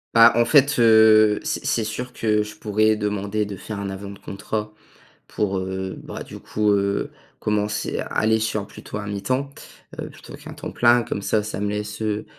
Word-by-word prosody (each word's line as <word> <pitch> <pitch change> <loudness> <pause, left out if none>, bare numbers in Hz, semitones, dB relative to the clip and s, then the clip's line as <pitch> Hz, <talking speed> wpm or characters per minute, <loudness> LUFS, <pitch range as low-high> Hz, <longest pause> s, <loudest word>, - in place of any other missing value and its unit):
Bah, 115 0 +8
en 120 - +5
fait, 140 +1 +4
heu, 110 -2 +6
c'est - - -2
c'est 115 - 0
sûr 125 +4 -5
que 105 -1 +1
je 105 0 -6
pourrais 110 +1 +2
demander 105 0 -1
de 100 -1 -6
faire 100 +2 -7
un 100 -1 -4
avenant 100 +1 -7
de 100 - -12
contrat 105 +1 -5 0.5
pour, 100 -2 -1
heu, 95 0 -4
bah, - - -7
du - - -10
coup, 105 -1 0
heu, 100 0 0 0.3
commencer 105 0 -1
à - - -3
aller 110 +1 +2
sur 110 -2 -1
plutôt - - -8
un 105 - -5
mi-temps, 130 +7 -2 0.5
heu, - - -6
plutôt - - -13
qu'un - - -10
temps - - -7
plein. 120 0 +4
Comme 100 - -4
ça 105 +1 +1
ça 105 -2 -5
me 105 - -1
laisse, 105 +1 -4
heu, 105 0 -1
105 Hz, 200 wpm, -23 LUFS, 100-110 Hz, 0.5 s, Bah